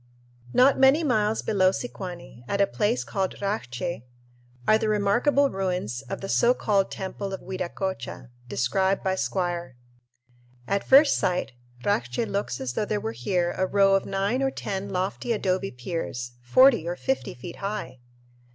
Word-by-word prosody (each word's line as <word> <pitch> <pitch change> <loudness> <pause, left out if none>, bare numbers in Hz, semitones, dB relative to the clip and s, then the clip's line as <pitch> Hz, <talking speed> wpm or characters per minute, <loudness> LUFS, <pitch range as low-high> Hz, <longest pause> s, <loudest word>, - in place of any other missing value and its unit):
Not 265 - +5
many 270 +5 +5
miles 220 -6 +1
below 190 -3 +3
Sicuani, 180 - -7
at 200 - -1
a 200 - +6
place 195 - 0
called 190 +8 -2
Racche, 175 - -3 0.7
are 215 - +5
the 220 - 0
remarkable 240 +8 +3
ruins 180 - -2
of - - -4
the 195 - -4
so 240 +5 +3
called 200 -5 +1
Temple 195 +1 -5
of 190 - -5
Viracocha, 185 -9 -5 0.2
described 190 +12 0
by 190 - +1
Squier. 175 -6 -2 0.9
At 200 +6 0
first 280 +2 +6
sight 180 -5 0 0.3
Racche 125 - 0
looks 200 -11 -2
as 130 -2 -3
though 210 - -1
there 210 0 -1
were 110 - -3
here 175 - -1
a 185 - 0
row 195 0 +4
of 195 - +2
nine 200 +7 0
or 270 - +2
ten 200 -6 -4
lofty 190 +6 -1
adobe 195 -2 0
piers, 125 -2 -5
forty 235 - +5
or 175 - -2
fifty 265 +7 -2
feet 150 +8 -9
high! 200 -9 -5
195 Hz, 155 wpm, -26 LUFS, 175-210 Hz, 0.9 s, a